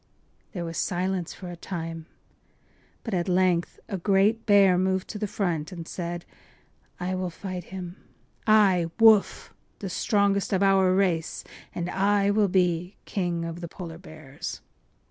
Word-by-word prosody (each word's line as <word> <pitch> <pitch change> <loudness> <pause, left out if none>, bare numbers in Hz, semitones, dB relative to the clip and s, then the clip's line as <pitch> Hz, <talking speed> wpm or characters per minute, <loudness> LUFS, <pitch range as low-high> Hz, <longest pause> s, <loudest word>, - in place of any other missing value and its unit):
” - - -39
There 175 -4 -4
was 165 0 -5
silence 185 -1 -1
for 180 -2 -8
a - - -7
time, 165 -2 -6 1.0
but 225 - -5
at 180 0 0
length 180 -1 +1
a 195 - -4
great 205 +5 +2
bear 200 -3 +6
moved 190 +1 0
to 210 - -5
the 210 - -1
front 175 -5 -2
and 170 -3 -7
said: 175 -1 -5 0.7
“I 180 +1 -2
will 185 -1 -2
fight 180 0 -6
him; 185 -1 -7 0.5
I—Woof—the 205 0 +3
strongest 200 0 +1
of 190 +1 +2
our 195 -1 +4
race! 175 -4 0 0.3
And 175 0 -2
I 200 +2 +2
will 205 0 +3
be 180 -1 +1
King 175 -4 -2
of 165 +1 -6
the 170 - -5
Polar 165 -1 -8
Bears. 155 -2 -8
185 Hz, 145 wpm, -26 LUFS, 170-195 Hz, 1.0 s, bear